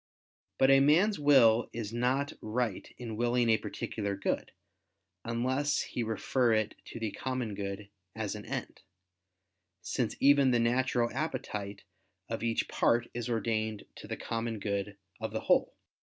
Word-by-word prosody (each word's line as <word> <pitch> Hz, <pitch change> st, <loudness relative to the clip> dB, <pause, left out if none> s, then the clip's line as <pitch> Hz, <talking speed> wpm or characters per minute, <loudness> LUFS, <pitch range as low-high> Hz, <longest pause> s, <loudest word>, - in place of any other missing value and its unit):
But 135 Hz, +1 st, +5 dB
a 135 Hz, -, +7 dB
man's 170 Hz, +9 st, +4 dB
will 125 Hz, -6 st, +5 dB
is 115 Hz, -2 st, -5 dB
not 130 Hz, +4 st, 0 dB
right 110 Hz, -2 st, -2 dB
in 115 Hz, -3 st, -6 dB
willing 120 Hz, 0 st, +2 dB
a 110 Hz, -, +4 dB
particular 100 Hz, -2 st, -4 dB
good, 100 Hz, -, -2 dB, 0.7 s
unless 130 Hz, +5 st, 0 dB
he 125 Hz, -, -4 dB
refer 115 Hz, +2 st, +1 dB
it 110 Hz, -1 st, +1 dB
to -, -, -8 dB
the 110 Hz, -2 st, -2 dB
common 130 Hz, -4 st, -3 dB
good 100 Hz, 0 st, -5 dB, 0.3 s
as 110 Hz, -2 st, -2 dB
an 105 Hz, -1 st, -7 dB
end: -, -, -5 dB, 1.0 s
since 120 Hz, +2 st, -1 dB
even 140 Hz, -1 st, +5 dB
the 120 Hz, -1 st, +3 dB
natural 120 Hz, 0 st, +1 dB
appetite 105 Hz, -8 st, -4 dB, 0.5 s
of -, -, -3 dB
each 115 Hz, -1 st, 0 dB
part 120 Hz, 0 st, +1 dB
is 120 Hz, 0 st, -4 dB
ordained 110 Hz, -2 st, -1 dB
to -, -, -10 dB
the -, -, -4 dB
common 115 Hz, -1 st, -3 dB
good 100 Hz, -1 st, -3 dB, 0.2 s
of -, -, -4 dB
the -, -, -2 dB
whole. -, -, +2 dB
115 Hz, 150 wpm, -31 LUFS, 110-130 Hz, 1.0 s, a